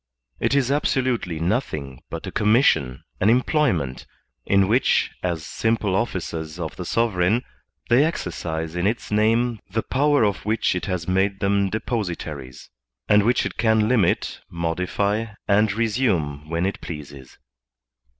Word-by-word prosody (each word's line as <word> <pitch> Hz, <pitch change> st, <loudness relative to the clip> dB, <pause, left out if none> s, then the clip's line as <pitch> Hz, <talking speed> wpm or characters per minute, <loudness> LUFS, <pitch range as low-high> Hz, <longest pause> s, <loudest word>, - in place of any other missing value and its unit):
It -, -, +1 dB
is 135 Hz, -2 st, +2 dB
absolutely 130 Hz, -, 0 dB
nothing 80 Hz, -, -2 dB
but -, -, -6 dB
a -, -, -5 dB
commission, 105 Hz, -, +2 dB, 0.2 s
an 100 Hz, -, +3 dB
employment, 120 Hz, -, +1 dB, 0.4 s
in 100 Hz, -1 st, +4 dB
which, 120 Hz, +6 st, +2 dB
as 85 Hz, -4 st, -2 dB
simple 110 Hz, -4 st, 0 dB
officers 85 Hz, -6 st, -3 dB
of 80 Hz, -2 st, -4 dB
the 90 Hz, -, -6 dB
sovereign, 110 Hz, +1 st, +1 dB, 0.4 s
they 120 Hz, +4 st, +5 dB
exercise 80 Hz, -, -3 dB
in 90 Hz, +2 st, +1 dB
its 115 Hz, +1 st, -2 dB
name 115 Hz, +2 st, +2 dB
the 110 Hz, +4 st, -1 dB
power 145 Hz, 0 st, +2 dB
of 100 Hz, -2 st, 0 dB
which 110 Hz, +2 st, +1 dB
it 90 Hz, -, -3 dB
has 90 Hz, -3 st, -3 dB
made 95 Hz, +1 st, +1 dB
them 100 Hz, 0 st, +1 dB
depositaries, 85 Hz, -, -4 dB, 0.4 s
and 105 Hz, 0 st, +5 dB
which 120 Hz, +4 st, +2 dB
it -, -, -5 dB
can 110 Hz, -2 st, +3 dB
limit, 110 Hz, -8 st, +1 dB
modify, 90 Hz, +6 st, -1 dB, 0.2 s
and 105 Hz, +1 st, +3 dB
resume 100 Hz, -, 0 dB
when 85 Hz, +2 st, 0 dB
it 95 Hz, -, -3 dB
pleases. 70 Hz, -5 st, -9 dB
100 Hz, 140 wpm, -23 LUFS, 85-115 Hz, 0.4 s, they